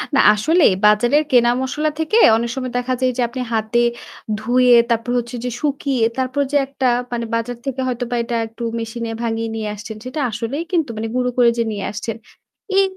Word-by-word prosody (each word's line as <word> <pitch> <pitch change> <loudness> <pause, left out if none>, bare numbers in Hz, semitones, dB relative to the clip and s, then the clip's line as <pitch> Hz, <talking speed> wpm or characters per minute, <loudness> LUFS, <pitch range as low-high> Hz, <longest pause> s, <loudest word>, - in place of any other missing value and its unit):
না - - +4
আসলেই 295 - +3
বাজারের 240 +8 +4
কেনা 240 -1 +5
মসলা 300 +4 -1
থেকে 320 +8 +1 0.2
অনেক 235 +1 -2
সময় 255 -2 -4
দেখা 250 +1 -1
যায় 255 - +3
যে - - +1
আপনি 255 +1 -5
হাতে 220 +2 +1 0.6
ধুয়ে 245 +2 +4
তারপর 230 +1 0
হচ্ছে 240 +1 -3
যে - - -1
শুকিয়ে 275 -5 0
তারপর 260 +2 -1
যে 290 - +3
একটা 270 -2 -1 0.2
মানে 235 -1 -2
বাজার 235 +1 -3
থেকে 265 -1 -3
হয়তোবা 245 -1 -2
এটা 235 0 -3
একটু 225 +2 -9 0.2
মেশিনে 230 0 -5
ভাঙিয়ে 225 -1 -2
নিয়ে 215 -1 -3
আসছেন। 210 +1 -8
সেটা 255 +5 -5
আসলেই 235 +9 -3
কিন্তু 325 -7 +1
মানে 225 +1 -3
গুঁড়ো 250 0 +1
করে 240 -1 +6
যে 230 - +2
নিয়ে 200 -2 -4
আসছেন। 220 +1 -4 0.6
এই 390 - +6
245 Hz, 190 wpm, -19 LUFS, 230-260 Hz, 0.6 s, করে